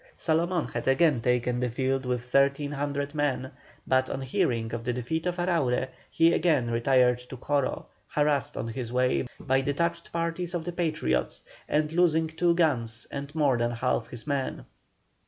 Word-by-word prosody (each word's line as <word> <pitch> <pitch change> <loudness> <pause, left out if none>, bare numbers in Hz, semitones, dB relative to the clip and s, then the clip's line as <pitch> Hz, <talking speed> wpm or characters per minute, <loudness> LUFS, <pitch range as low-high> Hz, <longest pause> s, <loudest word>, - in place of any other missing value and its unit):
Salomón 170 +1 0
had - - -3
again 135 -1 +4
taken 125 0 +1
the 125 0 0
field 130 +2 -1
with 125 -1 0
1,300 140 +1 +1
men, 140 -3 -1 0.3
but 130 0 +2
on 135 - -3
hearing 115 -3 0
of 115 -1 -3
the 125 - -1
defeat 155 +8 -2
of 175 - -1
Araure, 155 -8 +1 0.2
he 165 +1 +4
again 140 -9 +2
retired 125 +1 +3
to 125 +1 -10
Coro, 140 +1 -1 0.2
harassed 145 -1 0
on 115 - -3
his 115 0 -5
way 125 +1 +1
by 135 0 +1
detached 170 +5 -1
parties 170 +1 -2
of 165 -2 -3
the 175 - -2
Patriots, 110 - -1 0.3
and 150 0 +1
losing 165 -1 +3
two 170 +2 +1
guns 120 -9 0
and 140 +2 -6
more 140 -6 +2
than 120 0 +1
half 120 -1 -1
his 120 -1 -8
men. 140 -3 -2
140 Hz, 165 wpm, -27 LUFS, 125-160 Hz, 0.3 s, again